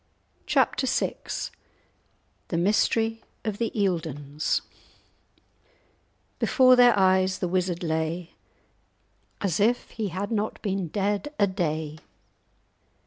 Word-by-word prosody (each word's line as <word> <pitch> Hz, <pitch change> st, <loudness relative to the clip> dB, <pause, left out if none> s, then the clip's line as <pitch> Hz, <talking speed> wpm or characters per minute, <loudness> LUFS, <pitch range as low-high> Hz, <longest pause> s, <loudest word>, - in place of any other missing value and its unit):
*Chapter 265 Hz, -, +2 dB
VI* 265 Hz, -, +1 dB, 1.3 s
*The 170 Hz, -, -2 dB
Mystery 225 Hz, +4 st, +1 dB, 0.2 s
of 210 Hz, -2 st, -3 dB
the 230 Hz, -2 st, 0 dB
Eildons* 160 Hz, -, -1 dB, 1.8 s
"Before 255 Hz, -3 st, +5 dB
their 245 Hz, -3 st, +6 dB
eyes 190 Hz, 0 st, +3 dB
the 180 Hz, -, -2 dB
Wizard 180 Hz, -1 st, -1 dB
lay 160 Hz, +1 st, -2 dB, 1.1 s
As 190 Hz, -3 st, 0 dB
if 235 Hz, +4 st, +1 dB
he 220 Hz, -2 st, -3 dB
had 195 Hz, +4 st, -4 dB
not 215 Hz, -1 st, -1 dB
been 195 Hz, -3 st, -1 dB
dead 205 Hz, -, -1 dB
a 205 Hz, -, +6 dB
day. 155 Hz, -5 st, -2 dB
190 Hz, 100 wpm, -26 LUFS, 170-215 Hz, 1.8 s, their